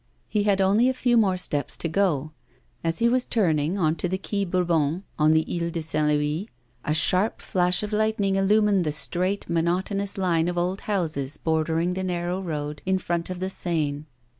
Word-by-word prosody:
He 205 -1 0
had 200 -2 +2
only 205 +6 +4
a 260 - -1
few 245 -1 +2
more 200 -5 +3
steps 145 -6 0
to - - -2
go. 165 -5 0 0.5
As 165 0 0
he 235 - +3
was 250 +1 +2
turning 165 -6 +1
on 160 -4 +1
to 180 - -1
the 190 - -1
Quai 200 +1 -2
Bourbon, 170 -2 0 0.2
on 155 +1 +5
the 160 0 +2
Isle 170 -1 -2
of 165 - -2
St. 155 -1 0
Louis, 150 +7 0 0.3
a 150 - 0
sharp 185 +7 +1
flash 180 +1 +1
of 210 0 -4
lightning 210 -2 +1
illumined 200 0 +3
the 155 - -1
straight, 180 +6 -1
monotonous 185 +4 0
line 170 -3 +1
of 175 0 -2
old 180 +3 -1
houses 155 -7 -1
bordering 160 +2 0
the 190 +1 -3
narrow 180 0 -2
road 150 -4 -4
in 190 0 +1
front 170 -1 -2
of 185 -1 -5
the 190 +1 -2
Seine. 155 -5 -2
180 Hz, 190 wpm, -25 LUFS, 160-195 Hz, 0.5 s, on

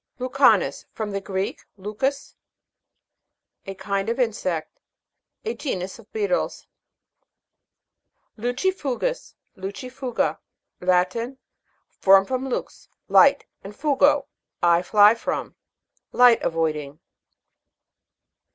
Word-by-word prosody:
LUCA'NUS. 255 +2 +2
From 215 -2 -5
the 200 0 -3
Greek, 195 0 -3 0.2
lukos, 215 +8 -3 1.3
a 195 - -5
kind 195 +2 -2
of 235 - -2
insect. 185 -9 -2 0.6
A 450 - -1
genus 195 - -4
of 220 - -18
beetles. 440 +3 -1 1.7
LUCI'FUGOS.? 280 - -2 1.5
Latin. 185 +8 0 0.5
Formed 195 0 +4
from 260 0 -2
LUCI'FUGA. - - -4
^ - - -7
lux, - - -5 0.2
light, - - +5 0.2
and 200 +1 -10
fugo, 285 0 +3 0.4
I 170 0 +5
fly 205 +3 +6
from. 230 - -4 0.6
Light 245 -2 +6
avoiding. 155 -3 -2
215 Hz, 90 wpm, -23 LUFS, 190-270 Hz, 1.7 s, fly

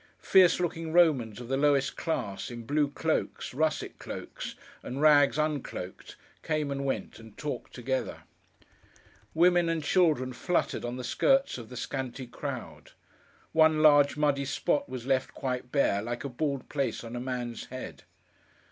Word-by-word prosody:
Fierce 185 -2 +5
looking 165 -2 -2
Romans 140 -11 +3
of 120 - -8
the 135 +2 0
lowest 140 -1 +2
class, 120 - -3
in 120 -1 -7
blue 145 +4 +1
cloaks, 160 -1 -2
russet 155 +3 -1
cloaks, - - -7 0.3
and 130 - -5
rags 145 -2 +5
uncloaked, 145 -11 -3 0.3
came 155 -2 -1
and 140 0 -3
went, 135 - -3
and 110 -2 -14
talked 145 -5 -5
together. 130 +1 -3 1.1
Women 175 0 +4
and 165 -2 -1
children 150 -9 +2
fluttered, 175 +8 -1
on 120 +1 -4
the 125 - -5
skirts 270 - +2
of 115 - -10
the 125 - -8
scanty 130 0 -4
crowd. 120 - -7 0.6
One 160 -1 +4
large 145 -1 +6
muddy 145 -2 +1
spot 135 +2 0
was 125 -2 -6
left 135 -1 0
quite 125 -2 -3
bare, 120 -8 +2
like 120 +2 -4
a 140 - -3
bald 140 +1 -2
place 140 -4 -2
on 115 +1 -7
a - - -3
man's 125 -2 -4
head. 130 0 -8
140 Hz, 155 wpm, -29 LUFS, 125-155 Hz, 1.1 s, large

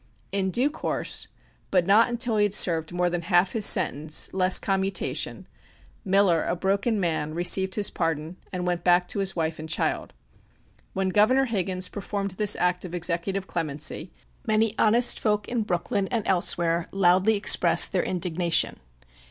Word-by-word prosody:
In 195 -1 -1
due 250 +9 0
course, 315 - -2 0.4
but 180 -3 +1
not 215 +5 +4
until 240 -2 -1
he 210 - +3
had 205 -1 0
served 165 -4 +2
more 175 0 -1
than 175 0 -3
half 175 +1 +1
his 220 -3 +4
sentence 155 -5 +1
(less 185 0 +2
commutation), 195 0 -2 0.6
Miller 195 -4 +2
a 175 - -2
broken 200 +4 -1
man, 160 -4 -2
received 190 +2 +1
his 205 -2 +1
pardon, 160 +2 -3
and 180 -1 -4
went 175 -1 -2
back 180 0 +3
to - - -2
his 190 -2 -1
wife 160 -2 -3
and 160 0 -8
child. 160 - -2 0.8
When 190 0 -1
Governor 230 +8 +3
Higgins 185 -5 -2
performed 200 -1 -5
this 205 +2 +2
act 180 0 -1
of 180 -1 -7
executive 175 +3 -2
clemency, 160 0 -3 0.4
many 215 0 +1
honest 235 +3 +4
folk 210 -2 -1
in 240 -2 -2
Brooklyn 200 +1 -2
and 230 -2 -3
elsewhere 170 -2 0
loudly 190 +3 +3
expressed 205 - +4
their - - +1
indignation. 175 -1 -1
185 Hz, 160 wpm, -24 LUFS, 175-205 Hz, 0.8 s, not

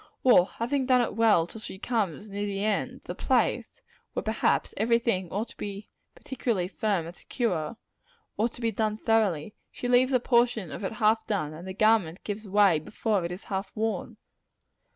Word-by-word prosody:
Or 215 -8 +6
having 260 +5 -2
done 255 -1 +5
it 240 - -1
well 215 -7 +4
till 215 +5 -10
she 190 - -7
comes 210 -3 -2
near 205 0 -3
the 200 0 -2
end, 215 -2 -1
the - - -5
place - - 0 0.3
where, - - -2
perhaps, - - +1
every 230 +1 +3
thing 190 -7 -1
ought 215 +6 -3
to - - -15
be 200 0 -6 0.3
particularly 230 -9 -2
firm 200 -4 -1
and 170 +2 -9
secure 215 - -2 0.6
ought 225 +3 0
to - - -10
be 230 -1 +1
done 215 0 -1
thoroughly 215 -6 +1 0.2
she 245 - -5
leaves 250 +2 +4
a 255 - +4
portion 235 -7 +2
of - - -6
it 190 - -2
half 220 +1 +2
done; 155 -8 -1
and 170 +4 -9
the 190 - -5
garment 210 -5 +2
gives 210 0 -5
way 195 -4 +4
before 205 +4 -1
it 170 - -4
is 180 +3 -7
half 195 -1 -4
worn. 220 0 -2
215 Hz, 190 wpm, -27 LUFS, 190-230 Hz, 0.6 s, Or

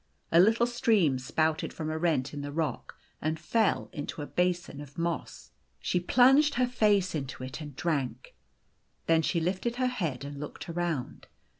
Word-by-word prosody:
A 165 - +6
little 225 +5 +5
stream 215 - +2
spouted 155 +5 0
from 155 -1 -4
a 160 - -2
rent 155 -6 0
in 145 - -5
the 145 0 -5
rock 160 +1 -3 0.2
and 155 +1 -1
fell 225 -3 +1
into 145 0 -5
a - - -4
basin 175 -4 -1
of 145 -1 -12
moss. 170 0 -3 0.3
She 180 - 0
plunged 265 - +5
her 250 +1 +3
face 210 -6 +2
into 135 -4 -4
it 130 +5 -6
and 145 -3 -8
drank. 165 - -2 0.7
Then 165 0 +4
she 170 +2 0
lifted 190 +8 -1
her 255 +1 0
head 170 - -2
and 140 0 -7
looked 150 - -7
around. 170 -6 -3
165 Hz, 170 wpm, -29 LUFS, 145-210 Hz, 0.7 s, A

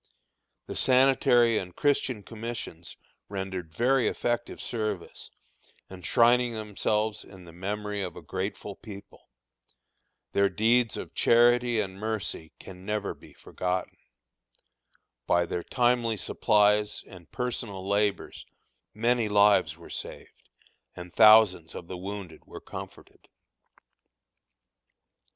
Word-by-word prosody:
The - - -7
Sanitary 125 -3 +4
and 90 -2 -8
Christian 135 -6 0
Commissions 115 -7 -7 0.3
rendered 95 -4 -5
very 125 +7 +2
effective 120 0 -2
service, 110 -3 -4 0.6
enshrining 120 +6 +3
themselves 105 0 -1
in 95 -2 -14
the 85 - -13
memory 105 +3 -4
of 90 -2 -5
a - - -10
grateful 100 +1 -5
people. 100 -3 -13 1.0
Their 100 0 +3
deeds 115 +4 +2
of - - -7
charity 120 0 +4
and 95 -2 -4
mercy 105 -7 -4
can 95 -1 -12
never 105 0 -2
be - - -17
forgotten. 90 0 -4 1.3
By 85 0 +3
their 85 - -3
timely 120 0 +1
supplies 105 +1 +2
and 85 -4 -15
personal 120 -6 -4
labors 100 0 -1 0.5
many 115 +1 +1
lives 100 -6 +4
were 85 - -13
saved, - - -9 0.5
and 90 0 -10
thousands 105 -7 +6
of - - -7
the 90 - -7
wounded 95 -2 -8
were - - -10
comforted. - - -11
105 Hz, 110 wpm, -27 LUFS, 95-115 Hz, 1.3 s, thousands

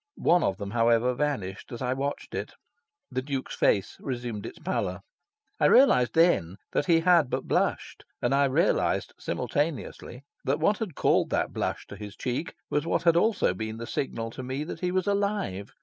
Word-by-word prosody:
One 175 +1 +3
of 95 - 0
them, 100 -1 -5
however, 115 +2 +3
vanished 120 -9 -3
as 120 - -6
I 125 -1 0
watched 140 +2 -4
it. - - -4 0.6
The 130 - -1
Duke's 135 0 -4
face 100 0 +1
resumed 120 -5 -4
its - - -10
pallor. - - -2 0.6
I - - +5
realised 125 - +5
then 160 - +3
that - - 0
he 165 -2 +5
had 170 -5 +4
but - - -2
blushed; - - -1 0.2
and 120 - +1
I 140 +1 +4
realised, 135 -1 +1
simultaneously, 145 -3 -3 0.2
that 140 +3 0
what 205 +7 +2
had 205 - -4
called - - +2
that - - 0
blush - - -2
to - - -10
his 105 0 -9
cheek 125 +8 -3
was 145 +2 -1
what - - +1
had 170 -2 +5
also 200 - +3
been 110 +3 -5
the 115 - -5
signal 115 -3 -3
to 130 - -7
me 130 +3 -3
that 155 - -6
he 180 - -1
was 185 0 0
alive. 200 - -1
130 Hz, 185 wpm, -27 LUFS, 115-165 Hz, 0.6 s, I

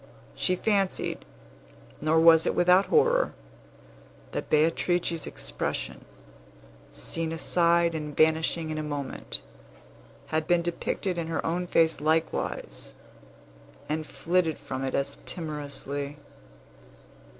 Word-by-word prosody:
She 185 - 0
fancied 195 -1 0 0.8
nor 155 +2 +3
was 165 0 +7
it - - +1
without 180 +2 +5
horror - - +3 1.0
that - - -4
Beatrice's 165 +1 +1
expression, - - -3 0.8
seen 160 - -3
aside 170 +1 +3
and 150 -2 -5
vanishing 160 0 +2
in 155 - -3
a - - -1
moment, 145 - -4 0.9
had 155 0 0
been 175 -1 +3
depicted 175 +1 -2
in 165 - -3
her 165 - -2
own 175 +2 -1
face 165 -3 +3
likewise, 160 - -1 0.9
and 155 +1 -2
flitted 170 -2 0
from 130 0 -5
it 130 - -1
as 140 0 -1
timorously. 145 -3 -4
160 Hz, 105 wpm, -27 LUFS, 150-175 Hz, 1.0 s, was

